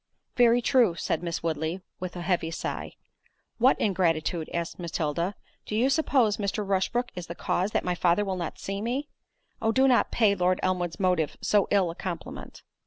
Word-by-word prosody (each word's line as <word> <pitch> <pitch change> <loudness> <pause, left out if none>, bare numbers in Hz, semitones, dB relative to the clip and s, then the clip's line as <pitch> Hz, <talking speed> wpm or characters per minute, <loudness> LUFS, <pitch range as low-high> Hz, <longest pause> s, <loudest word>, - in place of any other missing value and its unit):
"Very 240 -1 +4
true," 240 -9 +4
said - - -1
Miss 170 -2 -3
Woodley, 160 +2 -2 0.2
with 185 -1 -5
a 175 - -5
heavy 175 -2 0
sigh. 165 - -4 0.7
"What 255 +3 +4
ingratitude?" 170 -4 0
asked 170 +1 -3
Matilda, 170 +2 -2 0.3
"do 210 - -3
you 250 +5 +3
suppose 265 -8 +2
Mr. 205 0 -2
Rushbrook 200 +6 0
is 180 -2 -7
the 170 - -6
cause 185 +3 0
that - - -1
my 180 - +1
father 175 +3 +2
will 190 -1 -2
not 170 -3 -4
see 195 +1 -4
me? 255 +6 -2 0.5
Oh 225 0 +2
do 265 +3 +4
not 250 -2 +4
pay 215 -4 +3
Lord 180 -1 +1
Elmwood's 180 -2 -1
motive 180 -6 +1
so 205 -2 +3
ill 190 -4 +2
a - - -10
compliment." 175 -4 -7
185 Hz, 180 wpm, -27 LUFS, 170-220 Hz, 0.7 s, Very